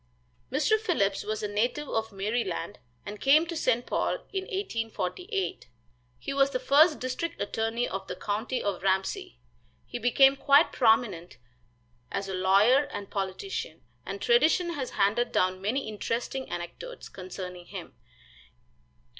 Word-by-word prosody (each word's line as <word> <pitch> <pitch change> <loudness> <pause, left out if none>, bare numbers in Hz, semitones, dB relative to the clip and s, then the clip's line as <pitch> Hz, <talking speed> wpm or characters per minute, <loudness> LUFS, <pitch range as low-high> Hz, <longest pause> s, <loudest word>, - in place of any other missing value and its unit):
Mr. 430 +11 +2
Phillips 215 - 0
was 215 0 -3
a - - 0
native 240 +8 -1
of 225 -2 -2
Maryland, 195 - -2 0.3
and 205 0 -7
came 300 +4 +5
to 340 0 -5
St. 250 -6 +1
Paul - - 0 0.2
in 385 -1 -2
1848. 370 - -3 0.5
He - - -5
was 275 0 +4
the 255 -2 -2
first 300 +4 +5
district 255 +6 -3
attorney 225 +3 -1
of 195 0 -5
the 180 - -4
county 215 +7 -2
of 200 -3 -2
Ramsey. 190 - -1 0.5
He - - -6
became 270 +3 +5
quite 280 +3 +5
prominent 220 -8 +2 0.7
as 195 - -2
a 190 - -4
lawyer 200 +9 +4
and 200 -7 -7
politician, 195 - -4 0.2
and - - -6
tradition 360 -7 +3
has 265 -5 -3
handed 220 +5 +2
down 185 0 +1
many 225 +7 -1
interesting 235 +5 -3
anecdotes 175 - -7
concerning 180 -1 -8
him. - - -8
230 Hz, 140 wpm, -28 LUFS, 195-280 Hz, 0.7 s, came